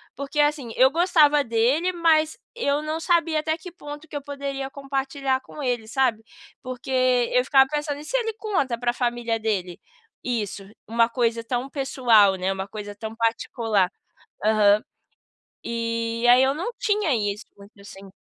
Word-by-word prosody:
porque, 280 +3 -4
assim, 295 -5 +1
eu 260 +1 +5
gostava 310 -3 +4
dele, 250 +9 +1
mas 320 -3 +2 0.2
eu 295 -10 0
não 310 +1 -3
sabia 330 -2 +1
até 315 +1 -1
que 345 +2 -10
ponto 295 -2 -10
que 300 - -11
eu 290 - -3
poderia 275 -1 -5
compartilhar 275 -1 -2
com 290 +2 -9
ele, 240 -4 -1
sabe. 245 -3 +1 0.4
Porque 255 0 -7 0.4
eu 250 - +4
ficava 265 0 +5
pensando: 295 -1 -3
"E 300 - -10
se - - -4
ele 450 -2 -2
conta 325 - -1
pra 240 0 0
família 240 -2 -1
dele 195 -5 -2 0.4
isso, 210 -5 -3 0.2
uma 230 +1 +2
coisa 230 -1 0
tão 245 +3 -2
pessoal, 245 -8 +3
né, 185 +1 -1
uma 190 0 -5
coisa 205 -1 -7
tão 220 +1 -7
particular.". 225 -3 0 0.6
Aham. 210 -1 +4 0.8
E 230 0 -2
aí 250 +2 +7
eu 265 +1 +2
não 355 +11 -4
tinha 415 - +1
isso, 205 0 -2
porque 200 0 -17
eu - - -15
sem 195 -1 -12
260 Hz, 165 wpm, -24 LUFS, 225-295 Hz, 0.8 s, aí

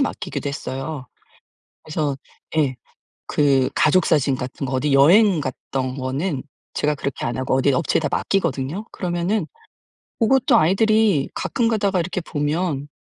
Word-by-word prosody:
맡기기도 270 - -2
했어요. 135 0 -5 0.8
그래서 150 -3 -2 0.4
예 135 -5 +1 0.6
그 135 -3 +3
가족사진 150 -4 +3
같은 130 +2 -5
거 130 - -4
어디 140 +3 0
여행 175 +6 +6
갔던 130 0 -4
거는 135 +3 -2 0.3
제가 150 0 0
그렇게 140 -1 -4
안 120 +2 -2
하고 130 0 -1
어디 135 +1 +3
업체에다 160 0 +1
맡기거든요. 190 0 -1
그러면은 175 +1 -1 0.7
고것도 260 +2 +4
아이들이 195 -2 +3
가끔가다가 215 -6 0
이렇게 180 +2 -3
보면 150 -2 -2
150 Hz, 310 characters per minute, -21 LUFS, 135-185 Hz, 0.8 s, 여행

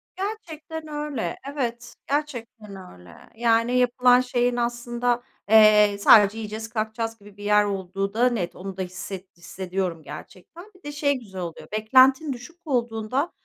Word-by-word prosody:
Gerçekten 320 -6 -6
öyle, 295 - -4 0.2
evet, 240 -4 -4 0.2
gerçekten 240 -8 -4 0.2
öyle. 90 -2 -15 0.2
Yani 230 +1 +2
yapılan 250 0 +4
şeyin 245 -1 0
aslında, 240 0 -1 0.3
eee, 210 -2 +6
sadece, 210 0 +6
"Yiyeceğiz, 220 +1 -6
kalkacağız." 225 0 -3
gibi 205 0 -16
bir 205 - -10
yer 210 0 +4
olduğu 195 0 -3
da 245 +3 +3
net 200 -8 -3
onu 190 0 -8
da - - -3
hisset 185 0 -7
hissediyorum 180 -2 -4
gerçekten. 340 - -12
Bir 370 - -22
de 290 - -6
şey 290 -1 +1
güzel 190 -5 -9
oluyor 170 -2 -7
beklentin 260 +7 +4
düşük 250 +8 -12
olduğunda 245 +2 -1
230 Hz, 145 wpm, -24 LUFS, 200-255 Hz, 0.3 s, eee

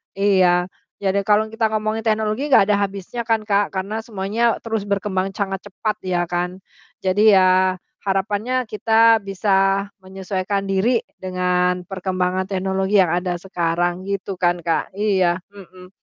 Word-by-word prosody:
iya. 185 -3 +3 0.3
Jadi 200 0 0
kalau 210 +2 +3
kita 225 -1 0
ngomongin 215 +1 -1
teknologi 220 +6 0
enggak 200 - +6
ada 205 - +4
habisnya 200 +4 -5
kan, 225 -1 +1
Kak, 205 -1 +1
karena 205 +4 -3
semuanya 220 +2 -1
terus 225 -2 -1
berkembang 195 -1 -1
sangat 195 -2 -3
cepat 210 +2 -2
ya 180 -2 -1
kan. 180 +2 -3 0.5
Jadi 205 +2 +5
ya 185 0 +3 0.2
harapannya 205 +6 -1
kita 225 +1 +3
bisa 195 0 +1
menyesuaikan 190 +1 -3
diri 200 +5 +1 0.2
dengan 180 -1 0
perkembangan 185 0 -2
teknologi 190 +1 0
yang 180 -4 +4
ada 180 0 -1
sekarang 175 0 -1
gitu 195 -1 -4
kan, 175 0 +2
Kak. 165 -2 0
Iya. 190 -4 +2 0.2
Hmm. 185 -2 -14
195 Hz, 140 wpm, -21 LUFS, 185-210 Hz, 0.5 s, enggak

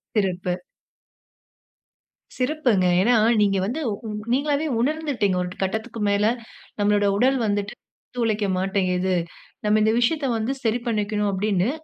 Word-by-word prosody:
சிறப்பு. 185 -3 0 1.8
சிறப்புங்க. 255 -8 +1 0.2
ஏனா, 235 +6 +3 0.3
நீங்க 195 -1 +3
வந்து 245 +10 -3
உ 210 +2 -6 0.3
நீங்களாவே 290 +2 +1
உணர்ந்துட்டீங்க. 270 -8 0
"ஒரு 180 - -4
கட்டத்துக்கு 220 +4 -3
மேல 200 +1 +2 0.5
நம்மளோட 205 0 +2
உடல் 260 +4 +3
வந்துட்டு 205 +1 -1 0.5
உழைக்க 215 -2 0
மாட்டேங்கிது. 185 -1 0 0.5
நம்ம 210 0 +3
இந்த 220 - +3
விஷயத்த 280 +5 +1
வந்து 220 +4 -1
சரி 230 +1 +1
பண்ணிக்கணும்." 210 -2 0
அப்டின்னு 195 +1 0
210 Hz, 115 wpm, -23 LUFS, 195-245 Hz, 1.8 s, ஏனா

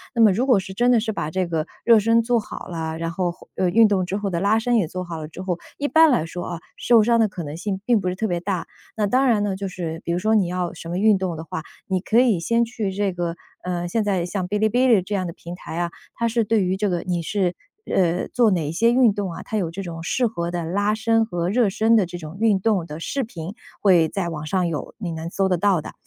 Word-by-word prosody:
那 235 - +3
么 220 -3 +7
如 230 +7 +1
果 250 -7 +4
是 190 0 -7
真 245 +4 +3
的 240 - +5
是 220 0 -2
把 150 -7 -3
这 185 +2 0
个 160 -2 -1 0.2
热 230 -1 +6
身 230 +2 +3
做 235 0 +1
好 210 - -8
了， 160 -2 -4
然 165 0 -3
后， 175 0 -1 0.2
呃， 185 - +1
运 225 +4 +6
动 190 -3 +1
之 190 - -3
后 205 -1 -2
的 170 -3 -1
拉 205 +4 +3
伸 240 +1 +1
也 190 -8 +1
做 185 +2 -5
好 175 -2 -6
了 155 - -6
之 165 +3 -9
后， 185 -2 -2 0.2
一 290 - -1
般 320 0 +6
来 210 - +2
说， 175 +2 -6
啊， 170 -2 -5 0.2
受 235 -3 +5
伤 235 +1 +3
的 220 - +4
可 185 -3 -7
能 150 +1 -6
性 195 +1 -3
并 235 -2 +3
不 185 - -3
是 180 - -1
特 220 +3 -1
别 175 -3 -1
大。 185 0 -3 0.3
那 210 -2 +1
当 255 +6 +3
然 225 -5 +3
呢， 200 -2 -1
就 200 0 -3
是 165 -3 -5
比 - - -1
如 175 - 0
说 220 +3 +2
你 195 -5 +3
要 180 -1 -2
什 165 -1 -9
么 175 - -2
运 210 0 +4
动 185 -3 -2
的 160 - -6
话， 160 0 -6 0.2
你 190 -1 0
可 220 +5 +2
以 235 -8 +3
先 230 +7 +2
去 220 -4 -3
这 200 0 0
个 170 -1 -3 0.3
呃， 175 -1 -2
现 220 +5 0
在 190 -4 0
像 185 +1 -3
哔 210 +1 0
哩 220 +1 +3
哔 250 +4 +3
哩 225 -7 +5
这 205 +3 -4
样 185 - -1
的 - - -4
平 170 +1 -9
台 170 - -8
啊， 175 0 0 0.3
它 235 - 0
是 230 0 +1
对 215 -1 +2
于 185 +1 0
这 205 +1 0
个 175 -2 -1
你 175 -2 -2
是， 180 0 -1 0.4
呃， 180 -1 +2
做 235 -3 +3
哪 170 -5 0
一 - - -2
些 230 +8 +3
运 245 -4 +5
动 200 -2 -3
啊， - - -8
它 220 - -3
有 180 -5 -1
这 190 +4 -6
种 165 -2 -6
适 240 +9 +1
合 170 -6 -3
的 175 -1 -2
拉 205 +5 0
伸 225 +1 +2
和 175 -5 -2
热 230 +1 +3
身 220 +3 +3
的 200 - +3
这 175 0 -7
种 160 +1 -9
运 220 -3 +3
动 200 -5 +1
的 155 -1 -8
视 275 +10 -2
频， 185 -5 -7 0.3
会 175 -5 +5
在 175 +1 -3
网 155 -2 -5
上 180 +3 0
有， 155 -3 -5
你 185 -6 -4
能 160 +1 -5
搜 190 +2 0
得 180 - +2
到 190 -2 +2
的， - - -8
190 Hz, 310 characters per minute, -22 LUFS, 175-220 Hz, 0.4 s, 么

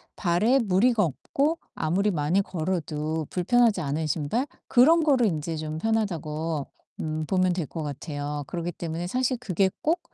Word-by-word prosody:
발에 210 +9 +3
무리가 215 +2 +3
없고 280 - 0 0.2
아무리 190 +6 +1
많이 165 +4 +1
걸어도 160 -3 -2
불편하지 220 +1 +3
않은 155 +2 -1
신발 160 - 0 0.2
그런 315 +7 +5
거를 270 -6 +4
인제 160 -1 -2
좀 155 0 -4
편하다고 165 -8 -1 0.3
음 155 0 -2
보면 185 -1 +2
될 175 -4 -2
것 160 -2 -5
같아요. 145 0 -4
그러기 175 0 -3
때문에 170 +1 -4
사실 255 +3 0
그게 195 -4 +1
꼭 335 +3 +1
175 Hz, 315 characters per minute, -26 LUFS, 155-225 Hz, 0.3 s, 그런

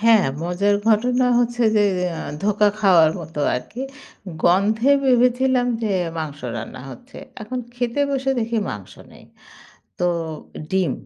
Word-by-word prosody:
হ্যাঁ, 225 -2 +5 0.2
মজার 185 +4 +1
ঘটনা 245 +4 +3
হচ্ছে 240 0 0
যে 210 - +5 0.6
ধোকা 210 0 +3
খাওয়ার 175 -6 +5
মতো 160 -2 -6
আরকি। 215 - -6 0.6
গন্ধে 210 +8 +3
ভেবেছিলাম 250 0 +3 0.2
যে 220 - 0 0.3
মাংস 150 -3 -5 0.2
রান্না 115 +3 -7
হচ্ছে। 250 - -13 0.3
এখন 250 +4 -5 0.2
খেতে 245 +2 -2
বসে 270 -1 0
দেখি 230 +1 -2
মাংস 100 -3 -8 0.2
নেই। - - -16 0.7
তো 180 - +1 0.6
ডিম, 185 -7 +1
215 Hz, 125 wpm, -21 LUFS, 180-245 Hz, 0.7 s, হ্যাঁ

